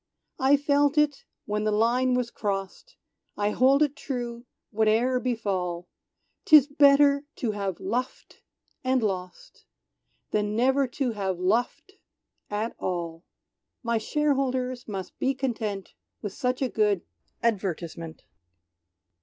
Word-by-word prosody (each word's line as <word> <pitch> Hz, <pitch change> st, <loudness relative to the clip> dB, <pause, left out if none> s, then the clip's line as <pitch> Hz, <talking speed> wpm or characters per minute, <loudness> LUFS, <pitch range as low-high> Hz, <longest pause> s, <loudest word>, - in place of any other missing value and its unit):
"I 270 Hz, +2 st, +5 dB
felt 285 Hz, +1 st, +2 dB
it 295 Hz, -2 st, +2 dB, 0.2 s
when 210 Hz, 0 st, -1 dB
the 215 Hz, -, +1 dB
line 245 Hz, +4 st, +2 dB
was 250 Hz, -1 st, -1 dB
crost, 200 Hz, -, -4 dB, 0.4 s
I 205 Hz, 0 st, +1 dB
hold 270 Hz, +6 st, +4 dB
it 290 Hz, -1 st, -1 dB
true, 245 Hz, -4 st, -5 dB, 0.2 s
whate'er 225 Hz, +4 st, +2 dB
befall, 190 Hz, -8 st, -2 dB, 0.5 s
'Tis 300 Hz, -4 st, +8 dB
better 280 Hz, -1 st, +5 dB
to 230 Hz, -, -1 dB
have 200 Hz, -4 st, -3 dB
luffed 250 Hz, +2 st, -4 dB, 0.4 s
and 255 Hz, -2 st, +1 dB
lost, 185 Hz, -3 st, -5 dB, 0.7 s
Than 210 Hz, 0 st, 0 dB
never 265 Hz, +3 st, +3 dB
to 250 Hz, 0 st, -2 dB
have 195 Hz, -4 st, -2 dB
luffed 210 Hz, +7 st, 0 dB, 0.6 s
at 210 Hz, +2 st, -2 dB
all! 170 Hz, -2 st, -3 dB, 0.6 s
My 230 Hz, -1 st, +1 dB
shareholders 260 Hz, -2 st, -1 dB
must 195 Hz, -4 st, -6 dB
be 265 Hz, +1 st, +1 dB
content 220 Hz, -7 st, -3 dB, 0.3 s
With 205 Hz, -2 st, -4 dB
such 250 Hz, +3 st, -1 dB
a -, -, +2 dB
good 210 Hz, -5 st, +1 dB, 0.4 s
advertisement." 175 Hz, -7 st, -2 dB
235 Hz, 120 wpm, -26 LUFS, 205-265 Hz, 0.7 s, Tis